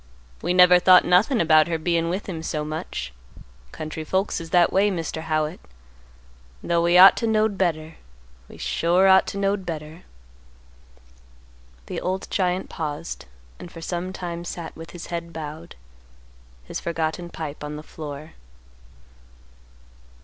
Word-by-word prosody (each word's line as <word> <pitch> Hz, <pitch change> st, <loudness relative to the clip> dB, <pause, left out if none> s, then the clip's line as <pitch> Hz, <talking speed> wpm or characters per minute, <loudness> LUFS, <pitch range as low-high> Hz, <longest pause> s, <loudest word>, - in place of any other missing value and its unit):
We 180 Hz, -, 0 dB
never 180 Hz, 0 st, +7 dB
thought 180 Hz, 0 st, +6 dB
nothin' 205 Hz, +8 st, +3 dB
about 155 Hz, -2 st, +5 dB
her 165 Hz, -1 st, -1 dB
bein' 165 Hz, +1 st, 0 dB
with 185 Hz, +4 st, -3 dB
him 170 Hz, -5 st, -5 dB
so 150 Hz, -1 st, -3 dB
much. 155 Hz, -, -5 dB, 0.6 s
Country 155 Hz, 0 st, -6 dB
folks 190 Hz, +2 st, -1 dB
is 165 Hz, -, -9 dB
that 175 Hz, 0 st, +3 dB
way, 200 Hz, +2 st, +4 dB
Mr. 165 Hz, -4 st, -4 dB
Howitt, 155 Hz, +1 st, -2 dB, 1.0 s
'though 170 Hz, -1 st, +1 dB
we 170 Hz, +1 st, +4 dB
ought 190 Hz, +2 st, +10 dB
to 230 Hz, -, -1 dB
knowed 215 Hz, -1 st, +2 dB
better; 160 Hz, -4 st, -2 dB, 0.5 s
we -, -, -12 dB
sure 175 Hz, +3 st, +2 dB
ought 190 Hz, 0 st, +6 dB
to -, -, -5 dB
knowed 200 Hz, 0 st, 0 dB
better." 160 Hz, -1 st, -7 dB, 1.8 s
The -, -, -5 dB
old 185 Hz, +1 st, -3 dB
giant 185 Hz, -1 st, 0 dB
paused 145 Hz, -, -6 dB, 0.3 s
and 175 Hz, -, -10 dB
for 165 Hz, -, -10 dB
some 175 Hz, +2 st, -4 dB
time 175 Hz, -2 st, -6 dB
sat 170 Hz, -1 st, -7 dB
with 165 Hz, +1 st, -10 dB
his 175 Hz, -, -9 dB
head 170 Hz, 0 st, -4 dB
bowed, 160 Hz, +1 st, -8 dB, 0.9 s
his -, -, -6 dB
forgotten 165 Hz, +1 st, -3 dB
pipe 155 Hz, -3 st, -7 dB
on 150 Hz, 0 st, -5 dB
the 150 Hz, -, -8 dB
floor. 150 Hz, -1 st, -9 dB
170 Hz, 145 wpm, -23 LUFS, 155-185 Hz, 1.8 s, ought